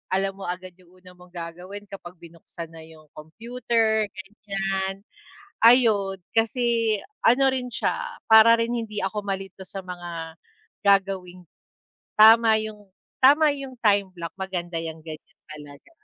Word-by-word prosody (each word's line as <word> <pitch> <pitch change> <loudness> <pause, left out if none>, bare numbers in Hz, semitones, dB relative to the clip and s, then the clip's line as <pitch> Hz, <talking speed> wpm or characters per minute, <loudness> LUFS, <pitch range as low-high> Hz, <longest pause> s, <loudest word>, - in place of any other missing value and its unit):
alam 195 0 0
mo 195 - -8
agad 185 0 -6
yung 185 0 -22
una 180 0 -15
mong 180 0 -18
gagawin 180 +4 -8
kapag 180 -3 -10
binuksan 170 0 -11
na 160 - -11
yung 160 -1 -17
computer, 225 +5 -1 0.4
ganiyan. 195 -1 -2 0.7
Ayun, 220 -5 +4 0.2
kasi 230 -1 +1 0.3
ano 250 +4 +5
rin 255 -1 -3
siya, - - -3
para 220 +1 +8
rin 230 +1 -1
hindi 220 -3 -4
ako 210 +2 -3
malito 195 -1 -5
sa 195 0 -7
mga 175 -2 -7 0.5
gagawing 190 -2 +1 0.8
tama 220 0 +7
yung 210 -2 -8 0.3
tama 295 +3 +6
yung 270 -2 -8
time 200 -3 +3
block, 170 -2 -7
maganda 180 -3 -4
yan 160 -1 -7
ganiyan 155 -1 -11
talaga. 145 - -13
195 Hz, 135 wpm, -24 LUFS, 175-225 Hz, 0.8 s, para